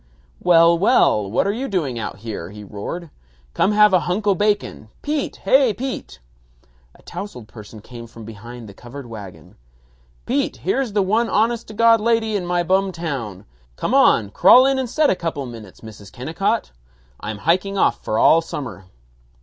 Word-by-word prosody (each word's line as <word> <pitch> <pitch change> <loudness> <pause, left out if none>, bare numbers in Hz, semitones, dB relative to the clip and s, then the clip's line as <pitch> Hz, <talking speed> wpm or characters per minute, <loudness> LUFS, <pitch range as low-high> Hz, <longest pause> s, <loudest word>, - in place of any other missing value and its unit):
"Well, 170 -1 +5
well, 140 - +3
what 105 - +1
you 265 +4 -3
doing 150 - -2
out 105 - -5
here?" 100 -7 -5
he 105 +1 -10
roared. 125 - -7 0.4
"Come 200 - +2
have 210 -1 +5
a 185 - +5
hunk 180 +5 -2
o' 200 - +4
bacon. 205 - -1
Pete! 295 -1 -2
Hey, 265 -6 +3
Pete!" 250 - -6 0.8
A - - -21
tousled 125 - -8
person 105 -1 -12
came 115 +1 -11
from 115 -1 -12
behind 115 +2 -10
the 100 - -11
covered 125 +6 -10
wagon. 105 -5 -11 0.7
"Pete, - - -1
here's 230 - -1
the 205 -1 +2
one 220 +5 +1
honest 230 +2 0
to 215 - -10
God 230 0 +5
lady 225 -1 +1
in 180 -3 -2
my 175 0 0
bum 190 +2 +1
town. 135 - -5 0.3
Come - - -3
on, 105 -3 +4
crawl 225 - +6
in 270 0 +2
and 255 -2 -3
set 300 +3 +2
a - - +1
couple 165 -6 -4
minutes, 115 -6 -11
Mrs. 105 -3 -12
Kennicott. 165 - -2 0.5
I'm 105 0 -5
hiking 185 - 0
off - - +1
for 110 - -2
all 165 +7 +5
summer." 135 - -7
170 Hz, 175 wpm, -20 LUFS, -, 0.8 s, crawl